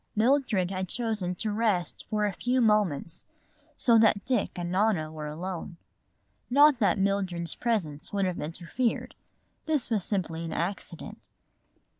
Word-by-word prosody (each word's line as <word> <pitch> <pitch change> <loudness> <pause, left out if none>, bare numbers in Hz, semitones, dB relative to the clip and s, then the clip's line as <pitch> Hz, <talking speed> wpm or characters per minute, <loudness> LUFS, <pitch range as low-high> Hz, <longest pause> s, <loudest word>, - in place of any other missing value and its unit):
Mildred 220 -6 +2
had 185 -1 -3
chosen 215 -7 -1
to 215 +4 -2
rest 205 -5 0
for 210 -1 +1
a 205 - -1
few 250 +7 0
moments, 205 - +1 0.5
so 230 -2 +5
that 210 -3 +3
Dick 245 -5 +1
and 175 -1 -4
Nona 185 -5 +1
were 155 -1 -6
alone. 170 +2 -5 0.7
Not 285 +1 +6
that 210 -1 +3
Mildred's 190 -4 0
presence 180 -12 -2
would 200 -1 +1
have 180 -1 -2
interfered; 175 +10 -2 0.5
this 300 -6 0
was 210 -5 +1
simply 170 -5 -2
an 165 - -4
accident. 175 -1 -4
195 Hz, 140 wpm, -28 LUFS, 175-225 Hz, 0.7 s, Not